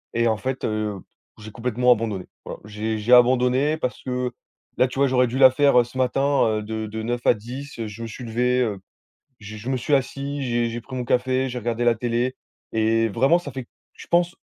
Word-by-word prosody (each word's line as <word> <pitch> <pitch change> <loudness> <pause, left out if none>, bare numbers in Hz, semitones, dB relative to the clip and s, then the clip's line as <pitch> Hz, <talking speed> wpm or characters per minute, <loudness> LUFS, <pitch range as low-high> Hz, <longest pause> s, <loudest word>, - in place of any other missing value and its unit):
Et 115 0 +2
en 110 -2 +1
fait, 130 +2 -4
heu, 110 -2 -2 0.4
j'ai 110 0 -10
complètement 125 +2 +1
abandonné. 110 -5 0 0.2
Voilà. - - -8
J'ai 110 +1 -3
j'ai 110 +4 +2
abandonné 125 +4 +4
parce 125 -5 -3
que 125 -1 -2 0.5
là, 130 - +4
tu 125 - -9
vois, 140 - +4
j'aurais 125 -1 +3
dû 125 +3 -4
la 130 -1 +8
faire, 140 -1 +4
heu, - - +4
ce 120 - -15
matin, 135 +2 +2
heu, 105 - -4
de 110 0 -4
de 110 +1 -5
9 120 +1 -2
à - - +6
10 125 +7 -8
heu 115 - -3
je 105 +2 -9
me 115 - -4
suis 115 +3 -9
levé, 125 +2 +1
heu, 105 -5 -1 0.6
j 105 0 -9
je 115 +5 -6
me 135 - +1
suis 135 +4 -2
assis, 140 +1 -2
j'ai 120 -2 0
j'ai 120 +1 -5
pris 130 +2 -9
mon 125 - -2
café, 130 +2 +1
j'ai 125 0 -4
regardé 120 +1 -2
la 120 -1 +4
télé 120 +2 -1 0.4
et 115 +1 +2
vraiment, 135 - +3
ça 145 -5 -8
fait, 130 -1 -7 0.3
je - - -13
pense, 175 0 +2
125 Hz, 230 wpm, -23 LUFS, 110-130 Hz, 0.6 s, la